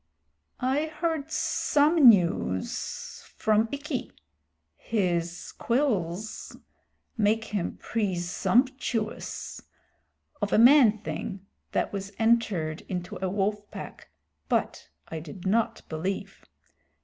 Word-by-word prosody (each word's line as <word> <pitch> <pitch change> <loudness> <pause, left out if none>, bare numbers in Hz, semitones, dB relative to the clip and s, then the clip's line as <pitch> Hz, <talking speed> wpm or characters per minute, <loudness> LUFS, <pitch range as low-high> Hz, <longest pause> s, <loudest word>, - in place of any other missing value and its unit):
"I 275 +5 +1
heard 315 -1 -2
some 300 -2 +4
news 170 - 0
from 220 +1 +2
Ikki 280 -2 -4 0.6
(his 175 -5 -2
quills 215 - -1 0.6
make 220 +1 +2
him 205 -5 -3
presumptuous) 225 +4 -1 0.8
of 205 - -1
a - - +4
man 240 -2 +7
thing 185 +5 -5 0.3
that - - 0
was 195 0 -5
entered 215 -9 +1
into 180 -1 -4
a 190 - 0
wolf 205 +2 -1
pack, - - -9 0.4
but - - -1 0.2
I 160 - -4
did 165 +4 -10
not 220 +4 +1
believe. 175 +5 -4
210 Hz, 95 wpm, -27 LUFS, 180-245 Hz, 0.8 s, man